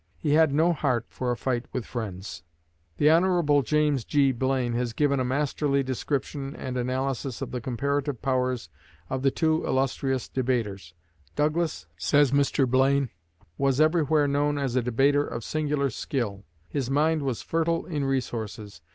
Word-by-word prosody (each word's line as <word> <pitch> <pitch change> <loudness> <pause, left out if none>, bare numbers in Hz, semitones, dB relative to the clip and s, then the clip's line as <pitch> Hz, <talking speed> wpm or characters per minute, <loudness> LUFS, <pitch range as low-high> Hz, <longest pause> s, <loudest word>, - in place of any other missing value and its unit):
He 150 - -1
had 160 -1 +5
no 160 +5 +3
heart 130 -7 0
for 125 - -3
a 120 - 0
fight 125 -1 -2
with 125 - -3
friends." 95 -6 -6 0.6
The 150 +1 +5
Hon. 170 -4 +3
James 150 -2 +1
G. 140 +1 +3
Blaine 130 -1 0
has 120 -1 -1
given 140 +1 +1
a - - +1
masterly 140 +1 0
description 135 +1 -3
and 130 -1 -5
analysis 130 0 -2
of - - -5
the 125 - -4
comparative 140 +2 -1
powers 130 -5 -1 0.4
of 130 0 -1
the 135 - +4
two 160 +2 +1
illustrious 135 -1 0
debaters. 105 -9 -2 0.4
Douglas, 155 - 0
says 140 +10 +3
Mr. 140 -1 +2
Blaine, 135 +1 +2 0.5
"was 135 -1 +2
everywhere 155 -2 +3
known 145 +1 +1
as 135 -3 -1
a 130 - +3
debater 135 +5 +2
of 115 -5 -5
singular 150 -2 -1
skill. 105 -9 -3 0.2
His 135 - -3
mind 155 +3 +2
was 130 -4 -2
fertile 165 0 0
in 150 -5 -2
resources. 110 - -3
135 Hz, 155 wpm, -26 LUFS, 125-145 Hz, 0.6 s, had